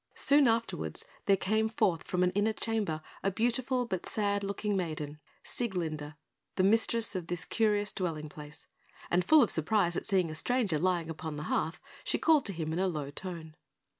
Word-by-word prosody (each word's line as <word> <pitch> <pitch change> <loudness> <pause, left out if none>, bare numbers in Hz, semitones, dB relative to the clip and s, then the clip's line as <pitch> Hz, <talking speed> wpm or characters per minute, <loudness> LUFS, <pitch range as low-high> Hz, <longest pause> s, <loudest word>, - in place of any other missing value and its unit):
Soon 285 -1 +5
afterwards, 230 0 -1 0.2
there 195 -1 +5
came 220 +3 +1
forth 200 -7 +1
from 180 0 0
an 180 - +3
inner 205 +3 +1
chamber 210 -10 -2 0.2
a 195 - +1
beautiful 245 +5 0
but 190 -6 -4
sad 205 -1 0
looking 200 +1 -1
maiden 155 -5 -3 0.2
Sieglinde, 160 -9 -3 0.4
the 185 - +2
mistress 225 +1 +2
of 180 -3 -3
this 175 0 -2
curious 210 -2 +1
dwelling 160 -5 -3
place 150 0 -10 0.5
and 180 +1 +3
full 310 - +6
of 230 - +3
surprise 175 +2 +2
at - - -3
seeing 185 -5 +2
a - - -5
stranger 200 -1 +1
lying 170 -1 0
upon 160 -1 -5
the 150 - -4
hearth, 160 - -1 0.2
she - - 0
called 315 -4 +4
to 200 - -2
him 160 -2 -3
in 170 - -1
a 190 - +2
low 150 -5 -3
tone. 165 -1 -7
185 Hz, 185 wpm, -31 LUFS, 160-220 Hz, 0.5 s, full